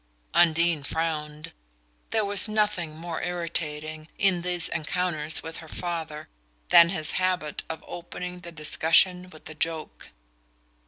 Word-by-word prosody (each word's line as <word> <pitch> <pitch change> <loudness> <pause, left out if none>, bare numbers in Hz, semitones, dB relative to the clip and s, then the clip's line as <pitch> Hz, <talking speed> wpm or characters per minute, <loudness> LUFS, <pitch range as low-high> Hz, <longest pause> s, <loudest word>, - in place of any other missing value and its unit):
Undine 170 -2 +4
frowned: 150 0 -3 0.6
there 220 -2 +1
was 200 +1 +3
nothing 210 -7 0
more 165 0 -5
irritating, 155 -3 -3
in 190 -3 +2
these 175 -1 +1
encounters 160 -1 -1
with 160 0 -7
her 160 - -10
father, 165 -2 -5 0.4
than 170 0 +8
his 155 -4 -2
habit 180 -5 0
of 160 - -6
opening 180 +1 -7
the 170 -1 -9
discussion 165 +3 +3
with 155 -3 -13
a 155 - -8
joke. 160 0 -3
165 Hz, 125 wpm, -26 LUFS, 155-180 Hz, 0.6 s, than